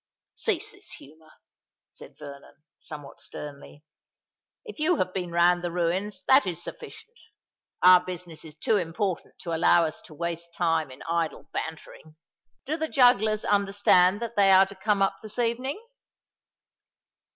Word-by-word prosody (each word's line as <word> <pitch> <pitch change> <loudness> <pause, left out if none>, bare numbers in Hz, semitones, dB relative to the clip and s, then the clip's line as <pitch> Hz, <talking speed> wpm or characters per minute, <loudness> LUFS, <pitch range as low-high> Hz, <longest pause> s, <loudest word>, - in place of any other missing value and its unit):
"Cease - - -2
this - - -13
humour," 155 +2 -17 0.6
said - - -13
Vernon, 140 0 -12 0.2
somewhat 150 -3 -10
sternly. 145 0 -10 0.8
"If 430 -8 -10
you 315 +4 +2
have 185 -8 -2
been 180 -2 -3
round 175 +1 +3
the 175 - -2
ruins, 185 +3 -2
that 265 -4 +5
is 175 -1 -4
sufficient. 450 - -10 0.6
Our 180 0 +8
business 175 -3 -7
is 155 -2 -11
too 210 +7 +1
important 180 +1 -3
to 170 -3 -4
allow 165 +1 +4
us 155 - -5
to 155 - -14
waste 170 +1 -5
time 165 -4 0
in 130 +1 -12
idle 165 -1 -2
bantering. 160 -1 -7 0.5
Do 310 +4 -2
the 315 -1 -3
jugglers 220 -5 +3
understand 200 0 +3
that 235 0 -6
they 200 -1 +4
are 190 0 +7
to 195 - -11
come 200 +1 +1
up 195 - 0
this 215 0 -8
evening?" 245 - -1
180 Hz, 150 wpm, -26 LUFS, 165-210 Hz, 0.8 s, Our